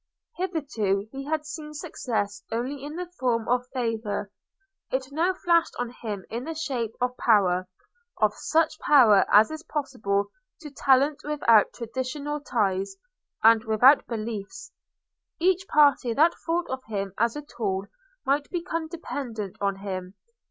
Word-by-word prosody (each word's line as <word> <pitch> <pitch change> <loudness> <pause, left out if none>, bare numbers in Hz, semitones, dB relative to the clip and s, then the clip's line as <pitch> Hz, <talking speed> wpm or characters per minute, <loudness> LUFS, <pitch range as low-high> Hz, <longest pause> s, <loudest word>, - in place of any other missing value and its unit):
Hitherto 270 - -1
he 275 0 -6
had 310 0 -2
seen 300 -1 -7
success 205 -8 -3
only 255 +5 -3
in 295 +2 -6
the 360 +1 -3
form 235 -3 0
of 250 0 +1
favour; 225 -5 -3 0.6
it 260 +1 -2
now 330 +6 +2
flashed 340 -3 +2
on 245 -1 -3
him 210 -6 -6
in 235 +2 -3
the 325 +3 -5
shape 250 -8 -3
of 250 0 0
power—of 200 - 0
such 320 -1 +1
power 235 -9 +6
as 215 +7 +6
is 315 0 -6
possible 250 -11 -2 0.3
to 300 -3 -9
talent 275 +1 +3
without 235 -8 +4
traditional 260 +5 -4
ties, 205 - -1 0.5
and 225 0 +6
without 245 +6 +5
beliefs. 220 - -5 0.7
Each 375 +2 +2
party 285 -6 +4
that 320 +4 +5
thought 340 +1 0
of 260 0 -4
him 200 -3 -4
as 235 0 +2
a 295 - -5
tool 200 -8 -3 0.4
might 285 +1 +1
become 330 -2 -3
dependent 240 - -5
on 200 -1 +1
him. 185 -1 -5
255 Hz, 140 wpm, -26 LUFS, 215-300 Hz, 0.7 s, power